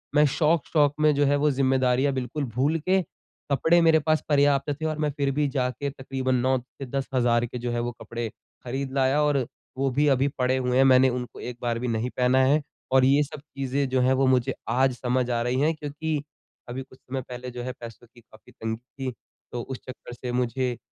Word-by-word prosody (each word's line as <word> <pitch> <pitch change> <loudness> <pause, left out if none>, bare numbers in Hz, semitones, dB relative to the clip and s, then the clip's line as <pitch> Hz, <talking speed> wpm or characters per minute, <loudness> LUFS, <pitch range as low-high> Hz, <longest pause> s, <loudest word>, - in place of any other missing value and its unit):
मैं 150 - +6
शौक़-शौक़ 150 -2 +2
में 150 -1 +5
जो 145 - +3
है 145 +1 +3
वो 150 +1 +3
ज़िम्मेदारियाँ 130 0 +2
बिल्कुल 130 +3 -3
भूल 145 +6 +2
के 185 +4 +2 0.5
कपड़े 160 +6 +4
मेरे 160 -1 +5
पास 155 +1 +1
पर्याप्त 145 0 +3
थे। - - -1
और 155 -1 -1
मैं 150 -1 +1
फ़िर 140 -1 +1
भी 145 +1 +1
जाके 135 +1 -2
तक़रीबन 130 -1 -2
9 130 +1 +2
से 135 +2 -10
10 135 +1 -3
हज़ार 120 -1 +2
के 125 - -6
जो 120 0 -3
है 120 - -1
वो 120 0 -2
कपड़े 115 -1 -4 0.3
ख़रीद 130 +2 -4
लाया। 135 +2 +2
और 140 -4 +2 0.3
वो 135 0 +1
भी 145 +4 +2
अभी 135 0 +3
पड़े 130 +1 +2
हुए 125 0 0
हैं 135 - +6
मैंने 130 0 +6
उनको 125 0 -5
एक 120 -1 -6
बार 120 -1 -1
भी 125 - -3
नहीं 115 +2 -1
पहना 130 +1 +4
है। 145 +3 +3 0.3
और 130 -1 +5
ये 140 +3 +4
सब 150 +1 -8
चीज़ें 135 -1 -2
जो 130 -1 +2
हैं 130 +1 +4
वो 135 +1 +2
मुझे 130 0 +2 0.2
आज 130 +2 +2
समझ 125 0 0
आ 115 - 0
रही 125 +2 0
हैं 160 +2 +3
क्योंकि 150 0 -3 0.5
अभी 130 +2 -4
कुछ 130 0 -19
समय 130 0 -5
पहले 125 0 -7
जो 120 0 -6
है 130 - -3
पैसों 115 0 -10
की 120 - -17
काफ़ी 110 -1 -19
तंगी 110 0 -4 0.3
थी। - - -4 0.4
तो 120 - -3
उस 130 +1 -6
चक्कर 130 -1 -9
से 125 0 -5
मुझे 125 0 -1
130 Hz, 220 wpm, -26 LUFS, 125-145 Hz, 0.5 s, मैं